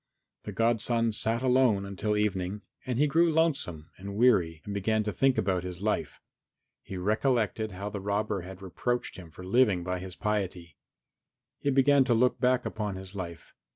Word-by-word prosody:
The -, -, -4 dB
godson 115 Hz, 0 st, +1 dB
sat 115 Hz, +3 st, -1 dB
alone 125 Hz, -6 st, +3 dB
until 100 Hz, +2 st, -2 dB
evening 100 Hz, -1 st, -1 dB, 0.2 s
and 125 Hz, -2 st, -1 dB
he 145 Hz, -, +4 dB
grew 165 Hz, +3 st, +3 dB
lonesome 135 Hz, -, 0 dB
and 100 Hz, +1 st, -6 dB
weary 95 Hz, -9 st, +3 dB
and 105 Hz, -, -5 dB
began 110 Hz, +2 st, +1 dB
to 105 Hz, -, -2 dB
think 135 Hz, +7 st, +2 dB
about 95 Hz, -2 st, 0 dB
his 90 Hz, -1 st, -6 dB
life. 105 Hz, +2 st, -2 dB, 0.6 s
He 95 Hz, -, -7 dB
recollected 110 Hz, +1 st, 0 dB
how 100 Hz, +3 st, -5 dB
the 100 Hz, -, -5 dB
robber 100 Hz, 0 st, -1 dB
had 95 Hz, +2 st, -10 dB
reproached 120 Hz, +6 st, -2 dB
him 90 Hz, -3 st, -10 dB
for 90 Hz, +3 st, -11 dB
living 100 Hz, -3 st, +3 dB
by 90 Hz, 0 st, -2 dB
his 90 Hz, 0 st, -6 dB
piety. 95 Hz, -7 st, -3 dB, 0.8 s
He 140 Hz, -, 0 dB
began 135 Hz, +1 st, +5 dB
to 120 Hz, -3 st, +3 dB
look 125 Hz, +2 st, +2 dB
back 125 Hz, -1 st, +2 dB
upon 105 Hz, -3 st, -3 dB
his 95 Hz, 0 st, -8 dB
life. 85 Hz, -4 st, -7 dB
105 Hz, 175 wpm, -29 LUFS, 95-120 Hz, 0.8 s, began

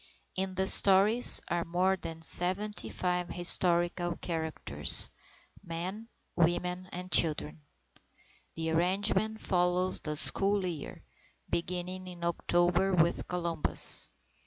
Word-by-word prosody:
In 190 Hz, 0 st, -4 dB
the 190 Hz, +1 st, -1 dB
stories 200 Hz, +5 st, +8 dB
are 170 Hz, 0 st, -2 dB
more 180 Hz, +3 st, -1 dB
than 165 Hz, -3 st, -10 dB
75 180 Hz, -1 st, -2 dB
historical 175 Hz, 0 st, 0 dB
characters, 160 Hz, -2 st, -2 dB, 0.5 s
men, 185 Hz, +6 st, -7 dB, 0.3 s
women, 180 Hz, +2 st, -2 dB
and 180 Hz, +1 st, -8 dB
children. 155 Hz, -1 st, +2 dB, 0.9 s
The 160 Hz, 0 st, -4 dB
arrangement 200 Hz, +6 st, -1 dB
follows 180 Hz, 0 st, -1 dB
the 150 Hz, -1 st, -6 dB
school 195 Hz, +4 st, +1 dB
year, 165 Hz, -5 st, -8 dB, 0.5 s
beginning 180 Hz, +2 st, -4 dB
in 175 Hz, -1 st, -12 dB
October 175 Hz, +2 st, -1 dB
with 170 Hz, 0 st, -1 dB
Columbus. 170 Hz, -3 st, 0 dB
180 Hz, 100 wpm, -28 LUFS, 170-190 Hz, 0.9 s, stories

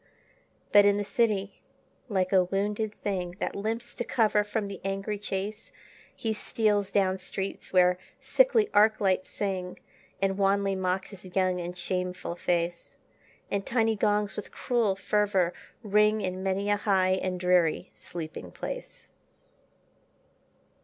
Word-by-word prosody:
But 205 Hz, -, +8 dB
in 200 Hz, 0 st, +4 dB
the 205 Hz, -, 0 dB
city, 205 Hz, -3 st, 0 dB, 0.5 s
like 190 Hz, -2 st, 0 dB
a 185 Hz, -1 st, +5 dB
wounded 205 Hz, +3 st, -1 dB
thing 180 Hz, -3 st, -2 dB
That -, -, -3 dB
limps 225 Hz, +4 st, -3 dB
to -, -, -3 dB
cover 215 Hz, -3 st, +2 dB
from 210 Hz, 0 st, -2 dB
the 200 Hz, -2 st, -8 dB
angry 195 Hz, +2 st, -2 dB
chase, 205 Hz, -, -4 dB, 0.4 s
He 225 Hz, -1 st, -2 dB
steals 210 Hz, -2 st, 0 dB
down 190 Hz, -1 st, +2 dB
streets 190 Hz, +1 st, -5 dB
where 180 Hz, -1 st, +4 dB, 0.2 s
sickly -, -, +3 dB
arc 215 Hz, +1 st, +5 dB
lights 190 Hz, -2 st, +1 dB
sing, 185 Hz, -3 st, -3 dB, 0.4 s
And 195 Hz, 0 st, 0 dB
wanly 195 Hz, 0 st, +2 dB
mock 185 Hz, 0 st, -1 dB
his 190 Hz, -2 st, -11 dB
young 185 Hz, -1 st, +2 dB
and 175 Hz, +1 st, -6 dB
shameful 180 Hz, -1 st, -2 dB
face; 175 Hz, 0 st, -2 dB, 0.6 s
And 200 Hz, -1 st, 0 dB
tiny 225 Hz, -1 st, +1 dB
gongs 210 Hz, 0 st, +1 dB
with 210 Hz, -, -6 dB
cruel 230 Hz, -6 st, +1 dB
fervor 195 Hz, -3 st, +1 dB, 0.3 s
ring 210 Hz, +1 st, +3 dB
In 185 Hz, -2 st, -3 dB
many 195 Hz, +2 st, 0 dB
a 205 Hz, -, +3 dB
high 190 Hz, -3 st, +2 dB
and 185 Hz, -1 st, -2 dB
dreary 180 Hz, -3 st, +2 dB
sleeping 160 Hz, -, -7 dB
place. -, -, -7 dB
195 Hz, 140 wpm, -28 LUFS, 185-210 Hz, 0.6 s, But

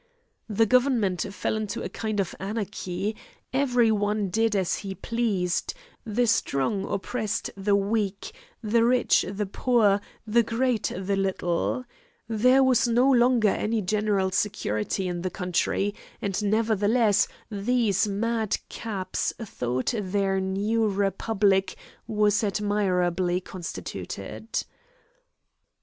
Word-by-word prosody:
The 220 Hz, +2 st, +3 dB
government 225 Hz, -6 st, +2 dB
fell 195 Hz, -, -2 dB
into 215 Hz, -2 st, -3 dB
a -, -, -2 dB
kind 215 Hz, -2 st, -3 dB
of 195 Hz, -, -1 dB
anarchy; 200 Hz, -1 st, -3 dB, 0.4 s
every 250 Hz, -4 st, +3 dB
one 205 Hz, -1 st, 0 dB
did 225 Hz, +1 st, +2 dB
as 190 Hz, -3 st, +1 dB
he 195 Hz, -1 st, -6 dB
pleased; 210 Hz, -, -1 dB, 0.3 s
the 230 Hz, +2 st, +1 dB
strong 195 Hz, -, +1 dB
oppressed 215 Hz, +1 st, -2 dB
the 200 Hz, +1 st, +1 dB
weak, 205 Hz, -, -1 dB, 0.3 s
the 230 Hz, +2 st, +3 dB
rich 245 Hz, +1 st, +3 dB
the 205 Hz, +1 st, -2 dB
poor, 205 Hz, -1 st, +2 dB, 0.2 s
the 230 Hz, +2 st, +4 dB
great 235 Hz, 0 st, 0 dB
the 195 Hz, +1 st, -1 dB
little. 190 Hz, +4 st, -1 dB, 0.4 s
There 250 Hz, +4 st, +4 dB
was 250 Hz, -2 st, +3 dB
no 245 Hz, +3 st, +4 dB
longer 240 Hz, -3 st, +4 dB
any 215 Hz, +2 st, 0 dB
general 205 Hz, -1 st, +1 dB
security 185 Hz, -, -1 dB
in 175 Hz, -1 st, -3 dB
the 185 Hz, -, -2 dB
country, 180 Hz, +3 st, -1 dB, 0.3 s
and 200 Hz, +1 st, -2 dB
nevertheless 215 Hz, 0 st, +3 dB, 0.2 s
these 210 Hz, -1 st, +1 dB
mad 220 Hz, +1 st, 0 dB
caps 200 Hz, -5 st, -3 dB
thought 130 Hz, -, -2 dB
their 195 Hz, -2 st, 0 dB
new 205 Hz, +4 st, 0 dB
republic 195 Hz, 0 st, +1 dB, 0.3 s
was 210 Hz, -1 st, +2 dB
admirably 185 Hz, -4 st, +1 dB
constituted. 185 Hz, -1 st, -6 dB
205 Hz, 115 wpm, -26 LUFS, 195-230 Hz, 0.4 s, the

